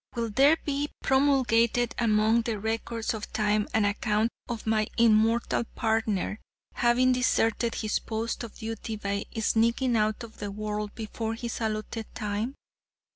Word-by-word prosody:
Will 230 -2 -2
there 280 +8 +5
be 290 0 -1
promulgated 245 -4 +3
among 220 0 +3
the 225 -2 -3
records 225 +1 -2
of 215 -1 -6
time 210 -1 +1
an 220 -2 +2
account 210 +2 +1 0.2
of 235 -2 -4
my 215 -1 +1
immortal 230 +1 +3
partner 220 -2 0 0.3
having 245 +2 +3
deserted 235 -2 +1
his 215 -1 -1
post 225 +2 -3
of 230 - -8
duty 225 0 -5
by 200 -1 -3
sneaking 230 +3 +2
out 215 +1 +1
of 225 -1 -11
the 205 - -4
world 210 0 -4
before 225 0 -4
his 235 0 -5
allotted 220 0 -3
time? 210 +5 -2
225 Hz, 140 wpm, -28 LUFS, 215-235 Hz, 0.3 s, there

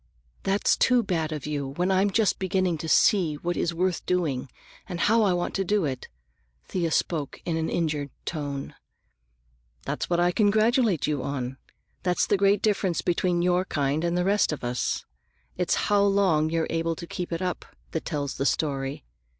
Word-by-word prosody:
"That's 195 +1 +2
too 250 -2 +3
bad 165 -5 -1
of 150 -3 -4
you, 145 -2 -2
when 175 +8 -1
I'm 190 +2 +3
just 210 +1 +1
beginning 185 -3 0
to 160 - -4
see 180 -8 +4
what 175 +4 -3
is 170 - 0
worth 180 +1 -1
doing, 155 -8 0 0.4
and 175 -2 -3
how 225 +2 +4
I 200 -4 +3
want 175 0 -2
to 195 - 0
do 200 -1 +1
it!" 130 -3 -4 0.6
Thea 175 -3 -1
spoke 155 -2 -1
in 165 - -1
an 160 0 -1
injured 150 -4 -1 0.2
tone. 145 -4 -4 1.1
"That's - - -3
what 175 -1 +2
I 175 0 +3
congratulate 215 - +3
you 145 -3 -1
on. 130 -1 -4 0.4
That's 180 -1 +1
the - - +2
great 200 +1 +3
difference 195 -5 +1
between 175 0 +1
your 180 0 +2
kind 145 -2 -1
and 170 0 0
the 180 - +1
rest 200 -1 +2
of 155 - -5
us. 120 0 -2 0.5
It's 180 -1 +1
how 205 -1 +3
long 195 -6 +3
you're 165 0 0
able 165 0 0
to 170 - -7
keep 175 +1 -5
it 165 +2 -2
up 180 -1 -2 0.3
that 160 - -3
tells 145 -4 -3
the 135 - -1
story. 135 - -1
175 Hz, 180 wpm, -26 LUFS, 150-190 Hz, 1.1 s, see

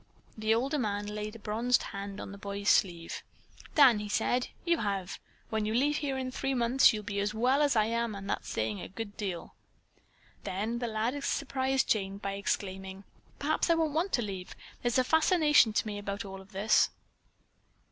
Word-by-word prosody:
The 220 0 +2
older 275 +6 0
man 205 -3 -1
laid 210 +1 -5
a - - -7
bronzed 230 +3 +1
hand 200 0 -6
on - - -7
the 200 - -9
boy's 200 0 -2
sleeve. 170 -4 +1 0.5
"Dan," 260 -8 +7
he 210 0 -5
said, 245 +4 +1 0.2
"you 340 -1 +2
have. 195 -3 -2 0.3
When 220 -1 0
you 215 +1 -1
leave 290 +4 +2
here 275 -3 -2
in 260 -1 -3
three 270 +1 -2
months 245 +2 +5
you'll 215 -2 -4
be 200 -1 -3
as 205 +1 -1
well 255 +6 +3
as 285 -3 +3
I 215 -1 +4
am, 230 -1 -1
and 195 0 -7
that's - - -3
saying 110 -2 -2
a - - -6
good 205 +1 -7
deal." 185 -5 -5 0.9
Then 215 +5 -2
the 240 - -2
lad 230 +6 -1
surprised 265 -1 0
Jane 195 -2 0
by 200 -1 -4
exclaiming: 195 -1 -3 0.3
"Perhaps 310 +4 0
I 335 - +5
won't 320 -2 0
want 345 +5 0
to 240 - +2
leave. 190 -3 -6 0.3
There's 240 0 +1
a 255 - +4
fascination 310 - +4
to 215 - 0
me 205 -1 -4
about 200 +1 -4
all 195 0 -8
this." 200 +2 +3
220 Hz, 190 wpm, -30 LUFS, 200-260 Hz, 0.9 s, Dan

